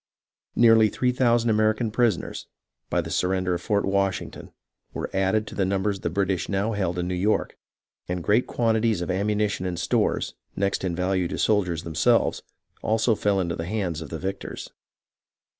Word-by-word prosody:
Nearly 115 -2 +6
three 125 +3 0
thousand 120 -2 +2
American 110 +1 +1
prison 115 -3 +2
ers, - - -7 0.4
by - - +1
the - - -7
surrender 90 0 0
of 85 - -3
Fort 100 +1 0
Washington, 100 -1 -2 0.4
were - - -4
added 95 +3 +1
to - - -9
the 100 - 0
numbers 95 +1 0
the 85 - -2
British 95 0 -1
now 100 +3 0
held 95 -5 -1
in 90 0 -1
New 90 - -2
York, 100 +4 0 0.5
and 90 -1 -3
great 110 +7 +2
quantities 110 -4 +1
of 85 - -2
ammunition 105 0 0
and 90 -1 -3
stores, - - 0 0.2
next 100 0 -1
in 90 -3 -1
value 90 0 0
to 95 - -4
the - - -6
soldiers 90 -6 +1
themselves, 80 0 +2 0.4
also 110 +1 +2
fell 100 -2 +1
into 85 -2 -1
the 80 - -5
hands 90 -6 -2
of 80 - -7
the 80 - -4
victors. 95 +4 -5
100 Hz, 175 wpm, -25 LUFS, 90-110 Hz, 0.5 s, Nearly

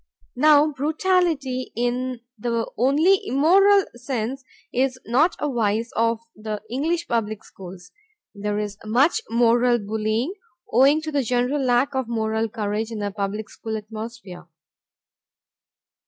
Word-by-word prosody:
Now 300 +3 +5
brutality, 300 -3 0
in 245 +1 -2
the 230 0 -2
only 305 - +3
immoral 385 +9 +4
sense, 250 +1 -4 0.3
is 255 0 0
not 285 +9 +2
a 295 - -2
vice 230 -3 0
of 230 0 +1
the 215 -1 -5
English 325 +6 -1
public 215 -3 -2
schools. 180 -1 -12 0.4
There 205 0 -3
is 210 -1 -4
much 260 - +2
moral 240 +1 +3
bullying, 220 - -2 0.4
owing 275 +6 +5
to 310 - -4
the 285 -2 +1
general 250 +3 0
lack 250 +2 +2
of 260 -2 -1
moral 220 -1 -1
courage 215 +1 -2
in 225 - -6
the 205 -1 -3
public 205 +1 -3
school 220 +1 -5
atmosphere. 215 -5 -9
240 Hz, 125 wpm, -23 LUFS, 215-275 Hz, 0.4 s, Now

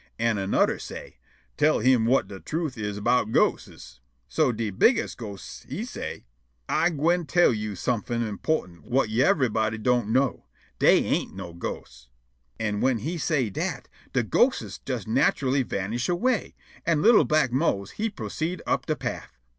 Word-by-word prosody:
An' 115 -1 +1
annuder 95 0 +1
say': - - -9 0.4
"Tell 155 +1 +4
him 120 -1 +3
whut 130 +3 +3
de 95 -1 -9
truth 155 - -3
is 105 -2 -4
'bout 110 +1 +1
ghostes." 65 - -1 0.3
So 155 -5 +2
de 110 -2 -3
bigges' 230 - +3
ghost 100 -5 -9
he - - -4
say': - - -7 0.4
"Ah 170 - +2
gwine 170 +2 +1
tell 175 -6 +4
yo' 105 -2 -4
somefin' 120 +3 -1
_im_portant 105 - -2
whut 125 -2 +1
yever'body 115 - +2
don't 120 -1 +1
know: 130 +3 +1 0.3
Dey - - +5
ain't - - -1
no 85 - -7
ghosts." 65 -7 -7 0.5
An' 105 -2 -1
whin 130 -2 +2
he 160 +10 -4
say' 135 -8 0
dat, - - -3 0.3
de - - +2
ghostes - - +1
jes - - -3
natchully 135 +2 +2
vanish 115 - -3
away, 225 +6 0 0.3
an' 165 -3 +1
li'l' 230 0 +7
black 155 -5 +2
Mose 120 - 0
he 225 +2 -2
proceed' 175 -3 -4
up - - -1
de - - +1
paff. - - -6
125 Hz, 155 wpm, -26 LUFS, 105-155 Hz, 0.5 s, li'l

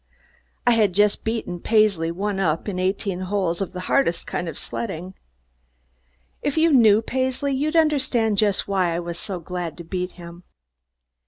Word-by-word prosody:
I 245 - +5
had 215 -5 +3
just 205 +2 +2
beaten 220 -6 -3
Paisley 210 -6 +2
"one 195 +3 -2
up" 165 -2 0
in 190 -3 -3
eighteen 190 0 -1
holes 185 -2 -1
of 195 - -2
the 180 -1 -6
hardest 180 -3 +1
kind 175 - -3
of 155 - -8
sledding. 155 +11 -5 1.3
If 290 - -2
you 320 0 +4
knew 220 -4 +6
Paisley 260 +3 -1
you'd 300 +4 -1
understand 265 -9 +2
just 205 -3 +2
why 185 -4 +1
I - - -1
was 170 0 -5
so 195 -4 -4
glad 175 0 -5
to 170 - -8
beat 180 +2 -4
him. 170 0 -11
195 Hz, 165 wpm, -23 LUFS, 175-225 Hz, 1.3 s, knew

